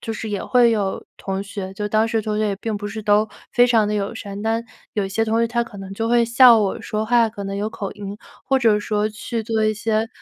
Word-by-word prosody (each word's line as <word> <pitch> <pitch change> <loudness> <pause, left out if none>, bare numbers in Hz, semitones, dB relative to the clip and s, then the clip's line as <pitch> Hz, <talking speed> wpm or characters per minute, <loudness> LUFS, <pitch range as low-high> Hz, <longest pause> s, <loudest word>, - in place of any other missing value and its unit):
就 225 - -4
是 220 0 -5
也 200 - -2
会 245 -2 +4
有 205 -3 -1
同 195 0 -3
学 200 -1 -6
就 210 +1 -3
当 215 +1 +2
时 225 -1 -1
同 210 0 -2
学 215 - +1
也 200 - -2
并 220 0 -3
不 205 0 -5
是 215 +1 -6
都 210 +1 +3 0.2
非 245 0 +5
常 225 -4 +3
地 210 - -1
友 205 +2 -2
善， 200 -2 -7
但 225 +1 0 0.3
有 205 - -1
一 195 - -4
些 225 +3 0
同 225 +1 +1
学 230 - +3
他 235 0 0
可 230 -3 -12
能 195 0 -8
就 225 +3 -2
会 235 0 +4
笑 240 0 +7
我 200 -3 -1
说 215 0 -3
话 230 0 +3
可 205 -2 -8
能 195 0 -4
有 210 +2 -1
口 210 -3 -5
音， 205 0 -7 0.3
或 270 - +2
者 220 -4 +3
说 210 0 -1
去 220 +2 -4
做 220 -1 0
一 215 0 +2
些 220 +1 -1
215 Hz, 290 characters per minute, -21 LUFS, 205-230 Hz, 0.3 s, 笑